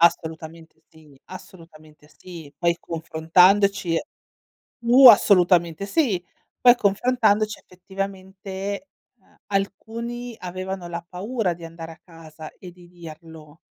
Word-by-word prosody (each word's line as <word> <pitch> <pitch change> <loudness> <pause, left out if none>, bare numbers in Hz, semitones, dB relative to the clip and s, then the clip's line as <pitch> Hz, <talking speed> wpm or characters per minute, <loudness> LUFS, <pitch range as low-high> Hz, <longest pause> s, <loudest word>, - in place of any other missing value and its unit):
Assolutamente 160 -1 -1
sì, 150 -3 -20
assolutamente 155 -5 -15
sì. 165 -5 -12
Poi 170 +1 0
confrontandoci 170 +3 +2 0.8
uh! 250 +3 +7
Assolutamente 180 -5 +4
sì, 210 - 0 0.4
poi 245 -1 +6
confrontandoci, 215 -1 +1
effettivamente, 190 +4 -7 0.3
uhm, 190 - -30
alcuni 230 +4 -4
avevano 185 0 -6
la 170 0 -7
paura 195 +1 -3
di 170 - -14
andare 165 0 -9
a 160 - -15
casa 160 -2 -13
e 180 - -11
di 175 0 -18
dirlo 160 -2 -13
180 Hz, 105 wpm, -23 LUFS, 165-200 Hz, 0.8 s, uh